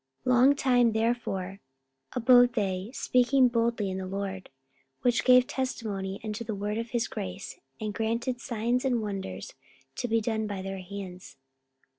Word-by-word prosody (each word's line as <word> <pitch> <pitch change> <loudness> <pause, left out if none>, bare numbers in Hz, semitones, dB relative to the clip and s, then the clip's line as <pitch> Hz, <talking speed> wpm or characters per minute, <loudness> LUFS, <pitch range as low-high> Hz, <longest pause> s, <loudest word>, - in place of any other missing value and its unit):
44:014:003 255 - +2
Long 260 +3 +6
time 245 -4 +3
therefore 220 -4 -1 0.5
abode 245 0 +5
they 195 -2 -1
speaking 255 0 +3
boldly 230 -3 0
in 190 - -3
the 190 - -5
Lord, 190 -1 -4 0.5
which 245 -1 +2
gave 250 -1 +6
testimony 205 -8 -3
unto 215 +1 -4
the 220 -2 -4
word 210 +2 -2
of 230 0 -4
his 240 -1 0
grace, 90 -1 -6 0.2
and 215 -1 -3
granted 230 +3 -2
signs 240 +1 -1
and 245 -4 +1
wonders 200 - -5 0.4
to 245 - -2
be 230 0 +2
done 220 -1 -1
by 200 -2 -4
their 195 0 -5
hands. 185 -6 -9
225 Hz, 155 wpm, -28 LUFS, 195-245 Hz, 0.5 s, Long